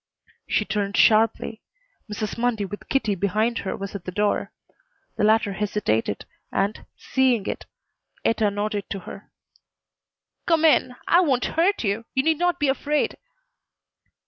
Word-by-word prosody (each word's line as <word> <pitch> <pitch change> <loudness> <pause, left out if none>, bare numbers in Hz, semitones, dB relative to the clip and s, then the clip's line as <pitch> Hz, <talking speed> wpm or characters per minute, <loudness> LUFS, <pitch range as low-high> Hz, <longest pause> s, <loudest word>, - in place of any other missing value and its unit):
She 210 - +1
turned 205 0 -1
sharply. 225 0 +3 0.5
Mrs. 210 0 -3
Mundy 230 -3 0
with 205 +2 -9
Kitty 245 -6 +1
behind 210 +5 0
her 190 - -4
was 195 0 -6
at 200 -3 -7
the 185 - -4
door. 205 +2 0 0.6
The - - -1
latter 215 -1 +3
hesitated, 195 - -1 0.3
and, 200 +2 -1
seeing 255 -6 +1
it, - - -4 0.6
Etta 220 -2 +2
nodded 205 0 -3
to 195 - -4
her. 195 - -10 1.2
"Come 325 -1 +3
in. 255 -5 +4
I 345 - +6
won't 265 -8 +1
hurt 355 +2 +1
you. 215 +2 -1
You 265 - +3
need 320 0 +2
not 355 0 +1
be 295 - +2
afraid." 290 +2 0
215 Hz, 145 wpm, -24 LUFS, 200-265 Hz, 1.2 s, I